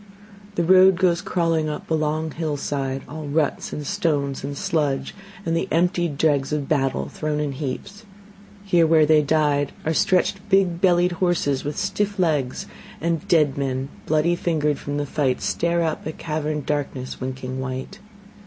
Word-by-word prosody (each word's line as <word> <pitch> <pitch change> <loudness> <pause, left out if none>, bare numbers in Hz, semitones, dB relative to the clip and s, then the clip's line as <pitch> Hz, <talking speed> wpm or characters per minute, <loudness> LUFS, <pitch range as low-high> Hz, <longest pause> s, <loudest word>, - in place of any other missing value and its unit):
The 175 - +1
road 185 +2 +7
goes 175 -1 +2
crawling 165 -3 0
up 150 - -6
a - - +4
long 155 0 0
hillside, 145 -4 -3
All 155 0 -7
ruts 150 +1 0
and 150 - -5
stones 145 -8 -1
and 140 +1 -4
sludge, 140 -4 -1 0.3
and 165 - 0
the 165 - 0
emptied 175 -2 +1
dregs 145 -3 +2
Of 150 -2 -1
battle 135 -3 0
thrown 150 -1 -3
in 150 -1 -1
heaps. 145 - -5 0.6
Here 175 -4 +4
where 160 -1 +5
they 155 0 +5
died 145 -1 +1
Are 160 - +1
stretched 185 +4 +2
big 190 -3 +3
bellied 180 -1 +4
horses 175 -6 0
with 145 +1 -4
stiff 200 +1 -1
legs; 150 -8 0 0.3
And 165 -1 -1
dead 150 -5 +3
men, 135 0 -2 0.2
bloody 155 +3 +2
fingered 150 -4 0
from 145 0 -4
the 145 - -1
fight, 135 -3 0
Stare 170 0 0
up 160 -1 -2
at 155 - -6
caverned 150 -2 -3
darkness 135 -4 -3
winking 130 0 -4
white. 130 +9 -5
155 Hz, 160 wpm, -23 LUFS, 140-170 Hz, 0.6 s, road